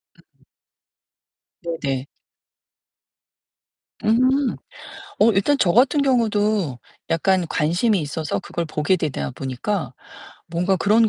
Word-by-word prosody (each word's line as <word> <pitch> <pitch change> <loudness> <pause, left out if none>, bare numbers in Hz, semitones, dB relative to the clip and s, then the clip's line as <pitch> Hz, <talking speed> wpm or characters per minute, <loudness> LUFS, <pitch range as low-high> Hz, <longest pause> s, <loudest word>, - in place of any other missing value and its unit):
음. - - -28 1.2
네네. 140 -6 -3 2.0
음. 255 +5 +2 0.7
어 225 - +6
일단 200 +9 +2
저 175 - +4
같은 275 - +4
경우도 215 - +1 0.3
약간 180 +2 +2
관심이 175 +8 +1
있어서 150 +1 -3
그걸 170 - -4
보게 155 +3 0
되다 135 - -3
보니까 135 - -3 0.6
뭔가 180 +3 +1
그런 220 +4 +3
185 Hz, 185 characters per minute, -22 LUFS, 155-220 Hz, 2.0 s, 어